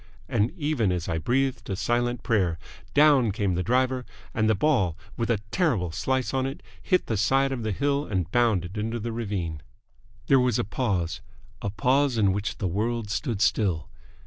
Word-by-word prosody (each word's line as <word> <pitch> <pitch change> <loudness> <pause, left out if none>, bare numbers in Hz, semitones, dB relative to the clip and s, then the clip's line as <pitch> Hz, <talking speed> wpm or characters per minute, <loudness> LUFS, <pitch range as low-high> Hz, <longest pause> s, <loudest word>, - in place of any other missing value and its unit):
And 105 +3 +1
even 145 - +1
as 90 -2 -2
I 80 - -1
breathed 125 +3 0
a 95 - -1
silent 120 +3 0
prayer, 95 -8 +1 0.4
down 140 -6 +5
came 100 -2 0
the 90 - 0
driver, 130 +4 +1 0.3
and 110 -1 +1
the 110 - +4
ball, 95 - +2 0.2
with 115 0 -2
a 115 - +3
terrible 115 - +1
slice 130 +9 -1
on 130 0 +1
it, 135 - -7 0.2
hit 185 - +1
the 110 - -1
side 135 +6 +2
of 130 -3 -3
the 110 -1 -2
hill 140 +6 0
and 90 -3 -2
bounded 105 -5 +1
into 115 +2 -2
the 115 +2 -4
ravine. 100 -9 -3 0.6
There 135 - +5
was 125 -3 +2
a - - +1
pause 95 -6 -1 0.4
a 100 - -2
pause 125 +6 +2
in 100 -3 +3
which 100 +2 -3
the 100 - -1
world 110 +4 -1
stood 115 -4 -2
still. 95 - +1
115 Hz, 185 wpm, -26 LUFS, 95-130 Hz, 0.6 s, down